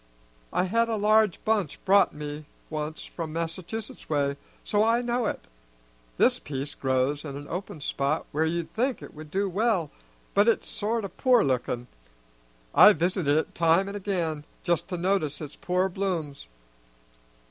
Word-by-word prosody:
I -, -, +2 dB
had 230 Hz, +5 st, +1 dB
a 225 Hz, -, 0 dB
large 215 Hz, -2 st, +3 dB
bunch 210 Hz, -9 st, +1 dB
brought 200 Hz, +1 st, +5 dB
me 150 Hz, 0 st, -6 dB, 0.3 s
once 155 Hz, 0 st, -4 dB
from 165 Hz, -2 st, -6 dB
Massachusetts 170 Hz, +7 st, -5 dB
way, 140 Hz, -2 st, +1 dB, 0.3 s
so 210 Hz, 0 st, +2 dB
I 230 Hz, +2 st, +3 dB
know 240 Hz, -1 st, 0 dB
it. -, -, -3 dB, 0.8 s
This -, -, +4 dB
piece 140 Hz, 0 st, -4 dB
grows 130 Hz, +2 st, 0 dB
in 140 Hz, -3 st, -6 dB
an 145 Hz, 0 st, -9 dB
open 175 Hz, -3 st, -5 dB
spot 140 Hz, +2 st, -1 dB
where 155 Hz, +2 st, +1 dB
you'd 170 Hz, 0 st, -3 dB
think 250 Hz, +3 st, 0 dB
'twould 155 Hz, 0 st, -11 dB
do 195 Hz, +4 st, 0 dB
well, 195 Hz, -4 st, +1 dB, 0.4 s
but 205 Hz, +2 st, +4 dB
it's 230 Hz, -, +2 dB
sort 220 Hz, +1 st, -1 dB
o' -, -, -5 dB
poor 245 Hz, +6 st, +3 dB
lookin'. 125 Hz, -2 st, -1 dB, 0.9 s
I've 210 Hz, -4 st, +8 dB
visited 170 Hz, -3 st, +1 dB
it 160 Hz, -, -1 dB
time 165 Hz, +3 st, +3 dB
an' 200 Hz, -, -5 dB
again, 175 Hz, -7 st, -2 dB, 0.2 s
just 170 Hz, -1 st, 0 dB
to 180 Hz, -, -3 dB
notice 175 Hz, -5 st, 0 dB
its 150 Hz, -2 st, -7 dB
poor 180 Hz, +1 st, 0 dB
blooms. 175 Hz, -, -3 dB
175 Hz, 160 wpm, -27 LUFS, 150-205 Hz, 0.9 s, I've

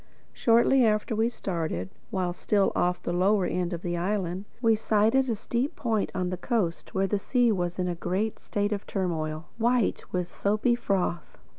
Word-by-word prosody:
Shortly 235 Hz, +3 st, +4 dB
after 215 Hz, +1 st, +1 dB
we 225 Hz, +2 st, +2 dB
started, 160 Hz, -, -3 dB, 0.2 s
while 180 Hz, -2 st, -1 dB
still 200 Hz, +2 st, +1 dB
off 180 Hz, 0 st, 0 dB
the 175 Hz, -, -2 dB
lower 190 Hz, +2 st, +3 dB
end 175 Hz, +1 st, -1 dB
of 170 Hz, -1 st, -5 dB
the 175 Hz, -1 st, -2 dB
island, 185 Hz, 0 st, -2 dB
we 225 Hz, -2 st, +4 dB
sighted 225 Hz, +5 st, +2 dB
a 230 Hz, -, +1 dB
steep 240 Hz, +6 st, -2 dB
point 220 Hz, -4 st, -1 dB
on 180 Hz, -1 st, -1 dB
the 180 Hz, -, -2 dB
coast 185 Hz, -5 st, -2 dB
where 190 Hz, 0 st, +2 dB
the 200 Hz, +1 st, 0 dB
sea 245 Hz, +2 st, +2 dB
was 175 Hz, -3 st, -1 dB
in 180 Hz, -1 st, 0 dB
a 175 Hz, -, -1 dB
great 185 Hz, +6 st, -2 dB
state 205 Hz, 0 st, -2 dB
of 205 Hz, -1 st, -3 dB
turmoil, 160 Hz, -4 st, -2 dB
white 240 Hz, -1 st, +2 dB
with 180 Hz, -1 st, -2 dB
soapy 215 Hz, +4 st, +1 dB
froth. 190 Hz, -7 st, -1 dB
195 Hz, 180 wpm, -27 LUFS, 175-225 Hz, 0.2 s, Shortly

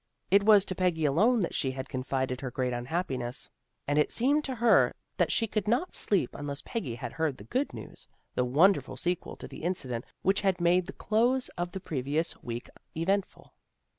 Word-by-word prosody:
It 200 Hz, +1 st, +6 dB
was 205 Hz, -1 st, +6 dB
to 185 Hz, -, -1 dB
Peggy 175 Hz, -4 st, +1 dB
alone 210 Hz, -, +3 dB
that 175 Hz, -, -1 dB
she 135 Hz, -, 0 dB
had 130 Hz, 0 st, -5 dB
confided 130 Hz, -1 st, -2 dB
her 130 Hz, -, -3 dB
great 125 Hz, 0 st, -1 dB
unhappiness, 125 Hz, -1 st, -3 dB, 0.4 s
and 145 Hz, +1 st, +2 dB
it 150 Hz, -, +2 dB
seemed 285 Hz, +5 st, +2 dB
to 260 Hz, -, -3 dB
her 235 Hz, -1 st, +4 dB, 0.2 s
that -, -, +2 dB
she 230 Hz, -, +2 dB
could 215 Hz, -1 st, -2 dB
not 250 Hz, +11 st, +1 dB
sleep 190 Hz, -, +1 dB
unless 145 Hz, -1 st, -5 dB
Peggy 140 Hz, -, -4 dB
had 115 Hz, -, -6 dB
heard 160 Hz, -4 st, -1 dB
the -, -, -11 dB
good 260 Hz, +4 st, -1 dB
news, -, -, -10 dB, 0.3 s
the 125 Hz, -, +1 dB
wonderful 160 Hz, +11 st, +3 dB
sequel 180 Hz, 0 st, -2 dB
to -, -, -9 dB
the -, -, -10 dB
incident 130 Hz, -9 st, -2 dB, 0.2 s
which 195 Hz, +1 st, +2 dB
had 195 Hz, -3 st, +1 dB
made 175 Hz, +1 st, +3 dB
the 195 Hz, -, -6 dB
close 245 Hz, +4 st, +1 dB
of 175 Hz, 0 st, -4 dB
the 190 Hz, -, -5 dB
pre 150 Hz, -7 st, -3 dB
vious 150 Hz, +5 st, -1 dB
week 120 Hz, 0 st, -5 dB, 0.3 s
eventful. 195 Hz, +4 st, -1 dB
175 Hz, 195 wpm, -29 LUFS, 135-205 Hz, 0.4 s, It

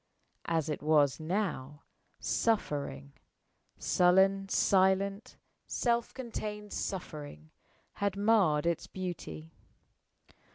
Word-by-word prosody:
As 165 Hz, -2 st, 0 dB
it 150 Hz, -, -3 dB
was 150 Hz, -2 st, +3 dB
now, 155 Hz, -5 st, -3 dB, 0.4 s
suffering 145 Hz, -, -1 dB, 0.6 s
sullen, 190 Hz, +2 st, +3 dB
silent, 195 Hz, +2 st, +2 dB, 0.3 s
self 235 Hz, -1 st, 0 dB
contained 210 Hz, -4 st, -6 dB
suffering 145 Hz, -, -5 dB, 0.4 s
had 200 Hz, -1 st, -1 dB
marred 200 Hz, -8 st, +3 dB
its 170 Hz, -1 st, 0 dB
beauty. 80 Hz, -, -6 dB
185 Hz, 80 wpm, -31 LUFS, 150-200 Hz, 0.6 s, was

